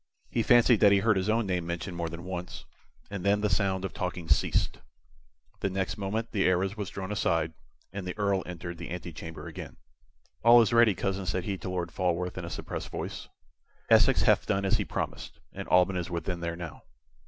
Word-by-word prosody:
He 115 - +1
fancied 120 0 +5
that 100 - +6
he 100 - +6
heard 105 +2 +3
his 95 +2 0
own 115 +1 +2
name 90 -3 -1
mentioned 85 +1 -4
more 85 -1 -2
than 85 +1 -8
once, 90 -1 -6 0.5
and 100 -3 -4
then 100 +1 +3
the 105 -2 +1
sound 95 0 +1
of 95 - -5
talking 90 -2 -4
ceased. 70 - +1 0.8
The 100 - 0
next 95 0 -2
moment 110 +3 -3
the 100 -3 +1
arras 95 +2 +1
was 105 -3 -4
drawn 95 +1 -5
aside, 80 -5 0 0.4
and 95 -2 -5
the 90 - -5
Earl 100 -2 +1
entered 85 -1 -6
the - - -6
antechamber 80 -2 -7
again. - - -8 0.7
"All 120 +1 +8
is 110 - -1
ready, 115 -4 +5
cousin," 95 +1 -2
said 90 0 -1
he 100 0 -2
to - - -5
Lord 90 -2 -3
Falworth, 90 0 -1
in - - -5
a - - -6
suppressed - - -5
voice. - - -5 0.6
"Essex - - +6
hath - - +3
done 100 -1 +1
as 95 +2 +3
he 105 - -2
promised, - - -5
and - - -6
Alban 90 +1 +4
is 90 - -3
within 85 +1 -3
there 85 0 -3
now." 85 -3 -8
95 Hz, 205 wpm, -29 LUFS, 85-100 Hz, 0.8 s, All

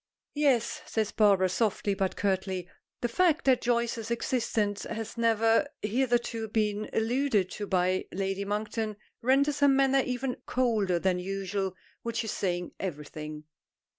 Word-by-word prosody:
"Yes," 275 -6 +2
says 220 -2 -1
Barbara, 200 -3 +4
softly 205 +1 0
but 190 -1 -1
curtly. 190 -2 -1 0.3
The 240 - +1
fact 335 +5 +2
that 260 -2 +4
Joyce's 235 -2 0
existence 230 -4 0
has 225 -1 -5
never 230 +3 +3 0.2
hitherto 235 0 0
been 210 -1 -1
alluded 225 -4 +1
to 205 - -5
by 185 0 +1
Lady 195 +1 -2
Monkton 215 +1 -2 0.2
renders 275 +3 +3
her 285 - +5
manner 270 0 +4
even 250 0 -2
colder 220 -8 +1
than 180 +1 +1
usual, 195 0 -3 0.3
which 230 0 -2
is 220 - -3
saying 180 -2 -2
everything. 150 -3 -6
220 Hz, 135 wpm, -29 LUFS, 195-240 Hz, 0.3 s, her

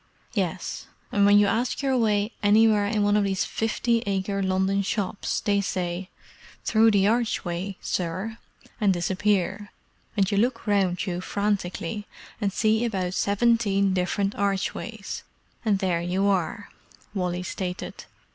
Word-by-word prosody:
"Yes, - - -2 0.2
and 200 0 +4
when 205 0 +7
you 205 - +6
ask 235 +7 0
your 270 -1 +2
way 210 -2 +2
anywhere 210 0 +4
in 210 -1 +1
one 205 0 +3
of 210 - +3
these 195 -1 0
fifty 230 +1 0
acre 195 0 -1
London 190 +1 +1
shops 200 0 -2
they 200 -1 +2
say, 185 -1 -3 0.6
'Through 225 0 +5
the 200 -3 +3
archway, 200 -5 0
sir,' 185 +6 -3 0.4
and 205 -2 +4
disappear: 190 +2 0 0.5
and 195 -1 +2
you 200 - +1
look 235 +1 0
round 195 -4 +1
you 180 -1 -3
frantically, 200 0 -2 0.3
and 200 -1 +1
see 220 +3 +2
about 190 -6 -1
seventeen 200 -2 +2
different 195 +2 0
archways, 200 +2 -2 0.4
and 210 -4 +2
there 180 -3 0
you 180 +3 0
are," 200 +1 0 0.4
Wally 180 -2 -2
stated. 180 0 -5
200 Hz, 135 wpm, -25 LUFS, 190-215 Hz, 0.6 s, when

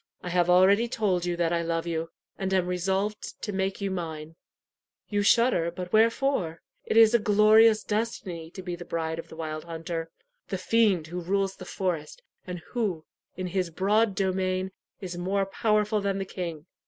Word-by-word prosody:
I 180 - -4
have 175 0 +2
already 195 +6 +5
told 195 -7 0
you 175 -1 -1
that 170 -1 +1
I 170 - +1
love 165 0 -2
you, 165 -1 -2 0.3
and 190 0 -3
am 185 -1 +2
resolved 190 +4 -2
to 210 - -2
make 190 +1 -2
you 200 -1 -1
mine. 160 -3 -5 0.7
You 205 -1 +1
shudder, 205 -5 +3
but 180 +1 -7
wherefore? 225 -6 +2 0.2
It - - 0
is 225 0 +7
a 235 - +5
glorious 215 +1 +5
destiny 200 -7 -3
to 190 +2 -9
be 180 -1 -4
the' 175 - -8
bride 160 -1 -3
of - - -8
the - - -10
wild 155 -1 -5
hunter 165 0 -5 0.4
the - - -3
fiend 210 -8 +2
who 175 +3 -5
rules 195 +2 0
the 185 - -10
forest, 175 -6 -3 0.2
and 180 -2 -6
who, 195 -10 -2 0.3
in 185 - -3
his 180 -1 -1
broad 200 +4 +2
domain, 185 0 0 0.3
is 180 -2 -5
more 195 +2 0
powerful 210 +1 +1
than 195 -1 -1
the 195 - -3
king. 170 -5 -6
185 Hz, 180 wpm, -27 LUFS, 170-205 Hz, 0.7 s, is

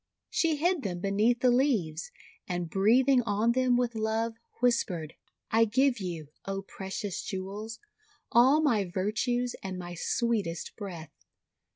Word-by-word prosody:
She 325 -2 +2
hid 345 +2 +1
them 180 -6 -3
beneath 210 +6 +2
the 250 - +5
leaves, 220 - +1 0.4
and 175 -2 -3
breathing 245 +7 +4
on 220 +1 +1
them 250 0 +3
with 245 -1 0
love, 220 +1 -1 0.3
whispered: 190 -10 +1 0.2
— - - -35
'I 225 +1 +5
give 255 +3 +2
you, 170 -6 -5 0.2
O 195 0 -3
precious 195 0 -5
jewels, 205 +3 -5 0.5
all 260 +6 +6
my 235 -9 +3
virtues 230 +7 -1
and 190 -1 -5
my 175 -1 -6
sweetest 205 -2 -1
breath. 175 -6 -7
220 Hz, 140 wpm, -29 LUFS, 190-245 Hz, 0.5 s, all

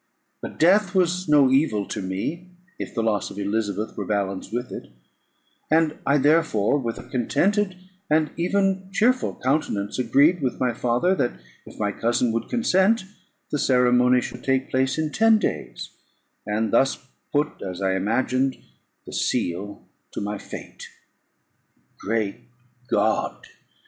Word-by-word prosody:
But - - -7
death 190 +3 +4
was 180 -1 +1
no 145 -3 +5
evil 130 -7 +2
to - - -3
me, 100 - -4 0.3
if - - -6
the 115 - 0
loss 110 -2 0
of - - -11
Elizabeth 105 0 -2
were - - -5
balanced 100 -2 -2
with 120 +2 -3
it; - - -7 0.8
and 160 -1 +2
I 140 - +4
therefore, 145 -5 +2
with 115 -3 -3
a - - -10
contented 185 - 0 0.3
and 155 0 +2
even 190 +2 0
cheerful 250 +6 +2
countenance, 125 -7 -1
agreed 145 +7 +3
with 130 -2 -2
my 125 -2 +1
father, 125 +10 +1
that 125 -10 0 0.3
if - - -12
my 105 -1 0
cousin 120 +2 0
would 115 +1 -3
consent, 225 -3 +2 0.5
the 150 - -1
ceremony 125 -1 +4
should 125 +1 -7
take 130 0 0
place 130 +2 +1
in 155 -1 -1
ten 225 +3 +5
days, - - -4 0.6
and 105 +1 -1
thus 135 +3 +3 0.3
put, 150 +1 -1
as 90 -2 -5
I 95 -1 +1
imagined, 130 +7 0 0.5
the - - -10
seal 95 +4 -2 0.3
to - - -4
my 105 0 -3
fate. - - -9 1.1
Great 110 -2 -1 0.5
God! - - 0
130 Hz, 145 wpm, -24 LUFS, 110-165 Hz, 1.1 s, no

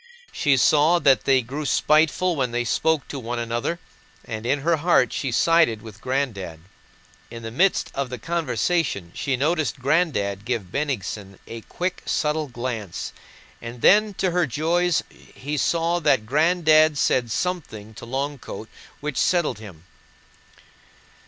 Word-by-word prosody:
She 140 -2 +2
saw 150 +6 +4
that 140 -5 +3
they 135 -2 +3
grew 140 +6 -5
spiteful 155 +5 +2
when 130 -4 0
they 120 +1 -1
spoke 155 +5 0
to 140 - -5
one 120 0 -4
another, 120 +7 -2 0.5
and 110 +1 -5
in 140 +2 +1
her 165 +2 +2
heart 150 -6 +3
she 135 - -2
sided 160 -6 +3
with 110 -1 -12
"Granddad." 110 - -3 0.7
In 115 0 -9
the 115 - -5
midst 185 +11 +1
of 135 -2 -2
the 125 - -5
conversation 155 - -1
she 135 -2 -2
noticed 155 +3 0
"Granddad" 130 - 0
give 110 -6 -3
Bennigsen 105 -8 -3
a 115 0 -8
quick, 180 +10 -4
subtle 155 -1 0
glance, 120 -7 -5 0.5
and 115 0 -9
then 210 0 +5
to 185 -1 0
her 175 -1 +1
joys 165 +6 +1 0.4
she 145 +3 -3
saw 170 +4 +1
that 135 -8 +2
"Granddad" 155 +2 +4
said 125 -3 +1
something 115 - -4
to - - -12
"Long 140 +3 -3
coat" 110 -1 -8 0.3
which 150 -2 -4
settled 170 - +1
him. 90 -7 -12
140 Hz, 145 wpm, -23 LUFS, 115-160 Hz, 0.7 s, then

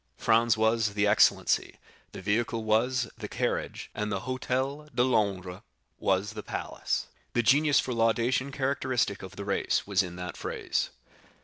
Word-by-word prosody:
Franz 115 0 +3
was 110 -1 +2
the 105 0 +2
"excellency," 105 +1 +3 0.4
the - - -9
vehicle 115 +3 0
was 120 +3 +2
the - - -5
"carriage," - - -3
and 105 0 -3
the 95 -2 -1
Hôtel 130 +4 -2
de 120 - +4
Londres 100 -6 0 0.4
was 100 +2 +1
the 110 - -6
"palace." - - -3 0.3
The 120 - +2
genius 145 +5 +4
for 125 - -2
laudation 120 +4 +1
characteristic 130 -6 0
of 95 +1 -9
the 100 - -6
race 100 - 0
was 100 -1 +2
in 90 -2 -6
that 90 -1 -6
phrase. - - -2
110 Hz, 150 wpm, -28 LUFS, 100-130 Hz, 0.4 s, de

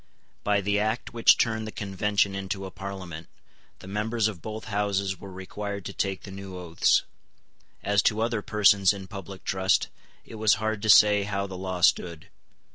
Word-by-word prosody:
By 105 0 +2
the 100 +1 +1
Act 110 +3 -2
which 115 -1 +5
turned 110 -2 0
the - - -6
Convention 100 0 0
into 95 0 -4
a 95 - -7
Parliament, 90 -4 -7 0.5
the - - -11
members 105 +3 0
of 100 -6 -6
both 110 +3 -6
Houses 100 -2 -1
were 100 - -10
required 100 +1 -6
to - - -5
take 95 -2 -2
the 100 - -9
new 95 -1 -8
oaths. 85 -2 +2 0.8
As 100 0 +3
to 110 0 -4
other 115 -1 0
persons 100 -2 +4
in 100 -1 -8
public 95 -1 -9
trust, 95 0 +1 0.4
it 110 - -10
was 110 -2 +5
hard 110 -1 -2
to 110 - -2
say 105 0 +7
how 100 0 -2
the 95 -1 -7
law 95 -1 -4
stood. 85 -2 +2
100 Hz, 180 wpm, -26 LUFS, 95-105 Hz, 0.8 s, say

